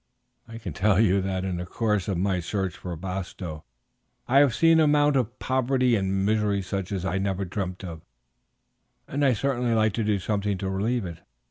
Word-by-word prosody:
I 115 - -8
can 115 - -6
tell 105 -1 +2
you 100 -3 +4
that 95 0 -2
in 90 -2 -2
the 90 - -4
course 105 -1 0
of 95 -4 -1
my 95 0 +1
search 95 +1 -2
for 90 -2 -6
Bastow 90 -2 -6 0.6
I 135 +3 +5
have 140 -5 +4
seen 165 0 +5
an 155 - +5
amount 145 -1 +3
of 120 -3 0
poverty 130 -1 +1
and 95 -1 0
misery 105 -2 +1
such 95 0 -4
as 95 -2 -2
I 95 +1 0
never 95 0 -1
dreamt 90 0 -4
of, 85 -4 -7 1.1
and 145 +2 -1
I 135 -2 +5
certainly 125 +1 0
should 115 - +2
like 110 -1 +2
to 115 - -1
do 105 -1 +1
something 100 0 -1
to 95 +1 -3
relieve 110 +3 -1
it. 85 -2 -7
100 Hz, 205 wpm, -26 LUFS, 95-120 Hz, 1.1 s, I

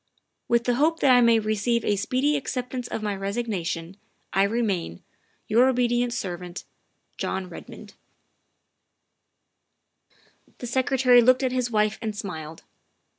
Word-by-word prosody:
" - - -53
With 235 0 +2
the 245 - +1
hope 320 +4 +2
that 270 - +5
I 245 - +6
may 235 -1 +5
receive 215 +2 0
a 205 - +2
speedy 255 +8 0
acceptance 250 -2 -4
of 220 - -5
my 205 -1 -1
resignation, 195 -4 -3 0.4
1 195 +1 +3
remain, 200 - -2 0.2
" - - -42
Your 240 +4 +4
obedient 245 -1 +1
servant, 180 -5 -5 0.3
" - - -46
JOHN 190 -1 -3
REDMOND." 170 - -11 2.6
The - - -7
Secretary 255 0 +4
looked 255 +3 +4
at 260 - +1
his 250 -1 -1
wife 215 -1 +1
and 215 -3 -4
smiled. 160 -6 -7
235 Hz, 140 wpm, -25 LUFS, 195-250 Hz, 2.6 s, I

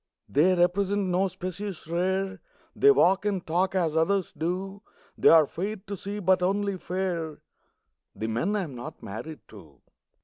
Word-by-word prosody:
They 175 +6 +3
represent 190 +2 +1
no 185 +2 +2
species 185 +1 -6
rare, 190 +2 -1 0.3
They 420 - +5
walk 195 - +4
and 200 -4 -1
talk 180 +4 0
as 165 -4 +1
others 185 +3 +1
do; 185 +5 -3 0.3
They're 160 -2 +6
fair 195 +9 -4
to 200 0 -7
see 200 +2 -6
but 190 -2 +2
only 200 +1 0
fair 175 -4 -3 0.8
The 110 - -4
men 120 - 0
I 205 - 0
am 150 -6 -7
not 120 -1 -9
married 130 +10 -7
to. 80 - -15
185 Hz, 150 wpm, -27 LUFS, 165-195 Hz, 0.8 s, They're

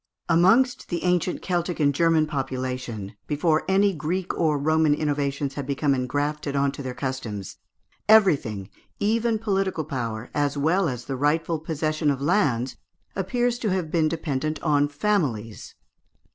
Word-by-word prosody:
Amongst 190 +10 +3
the 170 - -2
ancient 180 0 0
Celtic 175 -1 -1
and 145 -2 +3
German 165 +1 +3
population, 130 -7 -4
before 155 +1 +1
any 195 +1 +3
Greek 175 +4 -2
or 155 -3 +1
Roman 155 +1 +3
innovations 145 -2 -1
had 140 -2 -5
become 140 0 +1
engrafted 145 +3 -2
on 140 0 +2
to 140 - -8
their 130 -2 -5
customs, 120 -8 -5 0.5
everything, 140 - +4 0.3
even 225 +2 +1
political 195 -6 -1
power 115 -5 -4
as 145 -1 0
well 165 +5 +2
as 125 -2 -5
the 135 - -3
rightful 160 +4 +1
possession 155 -1 -1
of 140 -2 0
lands, 140 - +1 0.4
appears 240 +6 0
to 220 - -1
have 180 -4 -1
been 160 -2 +2
dependent 155 -2 -2
on 145 -2 +3
families. 145 - -2
150 Hz, 145 wpm, -25 LUFS, 135-175 Hz, 0.5 s, everything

